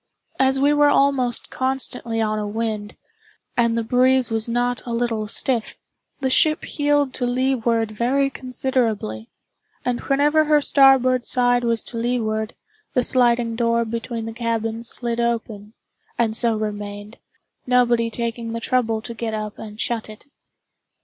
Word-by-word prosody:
As 265 0 +3
we 285 +2 +4
were 295 0 +5
almost 275 -4 +1
constantly 260 -3 -2
on 215 -1 0
a 210 - -3
wind, 215 -1 -3 0.6
and 235 -1 +2
the 230 - 0
breeze 255 +1 +3
was 225 +1 -1
not 245 +1 0
a 235 - -3
little 230 -2 -1
stiff, 235 +1 -1 0.5
the 265 - +1
ship 310 +4 +3
heeled 290 -2 +1
to 245 - -1
leeward 245 -3 0
very 265 +5 +1
considerably; 235 - -2 0.6
and 245 -1 0
whenever 295 +3 +2
her 300 0 +4
starboard 265 -3 +4
side 245 -1 +2
was 230 -1 0
to 235 - -7
leeward, 225 -2 -1 0.4
the 250 - +3
sliding 240 -2 +2
door 230 0 +1
between 230 0 -4
the 225 - -6
cabins 230 0 -2
slid 235 -1 -2
open, 225 -3 -2 0.4
and 225 -2 +1
so 230 -1 +2
remained, 205 0 -5 0.5
nobody 240 -2 +3
taking 230 0 -4
the 230 - -3
trouble 230 -3 0
to 235 - -7
get 225 -1 -3
up 215 -1 -5
and 210 0 -9
shut 230 -2 -2
it. 215 - -12
235 Hz, 150 wpm, -22 LUFS, 225-255 Hz, 0.6 s, were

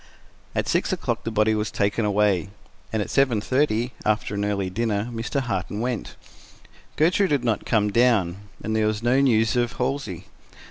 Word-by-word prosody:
At - - 0
six - - +1
o'clock - - -2
the - - 0
body 110 0 +3
was 105 0 -1
taken 105 +2 0
away, 100 -3 +2 0.4
and 110 -2 0
at - - -8
seven 130 -5 +3
thirty, 125 0 0
after 105 -1 0
an 100 0 -1
early 100 -2 -1
dinner, 105 +2 -1
Mr. 115 +5 -2
Harton 105 -4 -3
went. 120 -1 -3 0.8
Gertrude 180 +5 +3
had 140 -4 +1
not 115 -4 -1
come 105 -2 +2
down, 105 -6 +3 0.3
and 110 - -1
there 110 -1 +2
was 110 +1 -2
no 125 +3 +3
news 115 -4 +3
of 120 +1 +1
Halsey. 125 -9 -3
110 Hz, 175 wpm, -24 LUFS, 105-125 Hz, 0.8 s, body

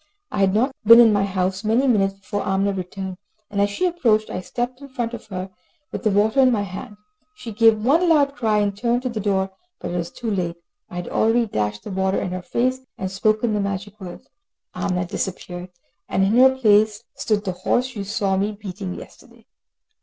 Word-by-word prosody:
I 205 - -3
had 195 0 +3
not 250 +6 +2
been 230 +2 +9
in 230 -3 +7
my 200 -1 +2
house 190 +1 -1
many 225 +5 +2
minutes 195 -6 +2
before 205 +1 -4
Amina 195 0 0
returned, 190 0 -5 0.3
and 200 -1 0
as 205 - +3
she 205 - -1
approached 235 -12 +1
I 185 - -3
stepped 245 +6 -4
in 280 - -10
front 240 -3 -3
of 230 - -8
her, 190 -1 -5 0.4
with - - -4
the 215 - +2
water 210 +5 +2
in 260 -1 +6
my 210 -4 +1
hand. 205 +3 -8 0.4
She 235 - -8
gave 220 0 +4
one 330 +7 +4
loud 285 -3 +4
cry, 220 -4 +1
and 200 -1 0
turned 235 +3 0
to 255 - -1
the 230 -2 -4
door, 195 -2 0 0.3
but - - -5
she 175 - -2
was 170 -1 -3
too 230 -2 -5
late. 175 -4 -1 0.3
I - - -10
had 175 0 -4
already 230 +2 +2
dashed 105 - -2
the - - -7
water 190 0 0
in 180 - -3
her 185 0 -4
face 255 +8 0 0.2
and 190 0 -4
spoken 215 +3 +1
the 210 - 0
magic 200 +1 -4
words. 180 -2 -9 0.5
Amina 180 -1 -1
disappeared, 180 0 -5 0.4
and 190 - +2
in 200 +3 +2
her 260 +1 +6
place 215 -2 +3
stood 210 -1 -1
the 190 - 0
horse 245 +8 -1
you 200 - -3
saw 195 -1 0
me 205 +2 0
beating 195 -2 -6
yesterday. - - -14
205 Hz, 215 wpm, -22 LUFS, 190-235 Hz, 0.5 s, been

